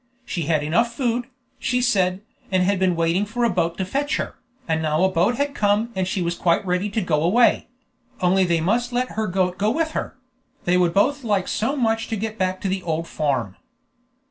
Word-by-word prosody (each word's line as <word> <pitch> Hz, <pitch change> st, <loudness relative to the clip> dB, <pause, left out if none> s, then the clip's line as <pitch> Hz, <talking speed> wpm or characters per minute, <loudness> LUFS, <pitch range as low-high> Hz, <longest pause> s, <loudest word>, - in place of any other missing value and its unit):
She 170 Hz, -9 st, -3 dB
had 155 Hz, -3 st, +1 dB
enough 230 Hz, +11 st, +1 dB
food, 240 Hz, -1 st, -1 dB, 0.3 s
she 250 Hz, -, 0 dB
said, 190 Hz, -6 st, +1 dB, 0.3 s
and 185 Hz, -1 st, +3 dB
had 195 Hz, +1 st, +1 dB
been 185 Hz, -2 st, +2 dB
waiting 165 Hz, +3 st, +1 dB
for 225 Hz, +4 st, -3 dB
a 235 Hz, -, +3 dB
boat 170 Hz, -2 st, 0 dB
to 190 Hz, -, -1 dB
fetch 280 Hz, +9 st, -1 dB
her, -, -, -4 dB, 0.3 s
and 160 Hz, -1 st, 0 dB
now 155 Hz, +2 st, +1 dB
a 190 Hz, -, +3 dB
boat 185 Hz, +7 st, +2 dB
had 285 Hz, +2 st, -1 dB
come 210 Hz, +2 st, +1 dB
and 190 Hz, -1 st, -1 dB
she 185 Hz, -1 st, -1 dB
was 170 Hz, 0 st, -1 dB
quite 170 Hz, +2 st, +1 dB
ready 180 Hz, +3 st, 0 dB
to 215 Hz, +2 st, -1 dB
go 155 Hz, -5 st, 0 dB
away; 215 Hz, +9 st, +3 dB, 0.5 s
only 185 Hz, +1 st, +3 dB
they 170 Hz, -2 st, +1 dB
must 235 Hz, +8 st, 0 dB
let 250 Hz, +1 st, 0 dB
her 220 Hz, 0 st, -2 dB
goat 180 Hz, -1 st, 0 dB
go 210 Hz, +2 st, +2 dB
with 315 Hz, +6 st, 0 dB
her: 270 Hz, -, -4 dB, 0.5 s
they 175 Hz, -, +3 dB
would 175 Hz, -2 st, +2 dB
both 280 Hz, +8 st, +2 dB
like 205 Hz, -5 st, 0 dB
so 265 Hz, +7 st, -1 dB
much 225 Hz, -4 st, 0 dB
to 225 Hz, -, -2 dB
get 220 Hz, +1 st, -4 dB
back 185 Hz, 0 st, 0 dB
to -, -, -2 dB
the 190 Hz, 0 st, -1 dB
old 165 Hz, -1 st, -2 dB
farm. 130 Hz, -, -2 dB
190 Hz, 220 wpm, -22 LUFS, 175-230 Hz, 0.5 s, and